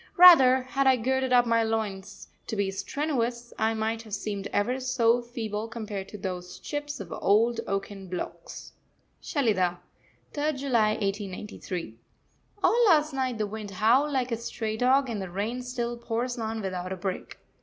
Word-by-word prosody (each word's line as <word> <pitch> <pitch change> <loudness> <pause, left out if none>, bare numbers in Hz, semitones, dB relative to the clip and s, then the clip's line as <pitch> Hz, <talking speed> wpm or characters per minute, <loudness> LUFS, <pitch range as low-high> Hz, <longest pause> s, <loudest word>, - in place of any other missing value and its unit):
Rather, 270 -8 +9
had 270 +1 0
I 260 - +6
girded 260 +2 0
up 245 -1 +6
my 230 -1 +3
loins 205 -3 -3 0.2
to - - -3
be 200 -2 0
strenuous, 240 +3 -2
I 220 +1 +2
might 220 +1 -1
have 215 -3 -5
seemed 200 -1 -4
ever 245 +6 0
so 245 -2 +2
feeble 225 -3 -4
compared 210 -4 -6
to 210 - -8
those 180 -2 -5
chips 290 -1 -5
of 180 -5 -8
old 225 +4 +2
oaken 195 0 -4
blocks. 180 0 -7 0.5
SHELIDAH, 190 - +1 0.6
3rd 300 0 -1
July 245 -6 +2
1893. 195 - -4 0.6
All 475 +1 +4
last 305 -4 +4
night 260 -3 -1
the 215 - 0
wind 210 0 -6
howled 230 +9 +3
like 255 -3 0
a 230 - 0
stray 220 -1 -4
dog, 260 +4 +3
and 220 -4 -3
the 190 - -5
rain 210 +7 -3
still 245 -1 -3
pours 235 +1 -2
on 220 0 -3
without 185 -2 -4
a 190 - -3
break. 185 +1 -5
225 Hz, 165 wpm, -27 LUFS, 200-255 Hz, 0.6 s, Rather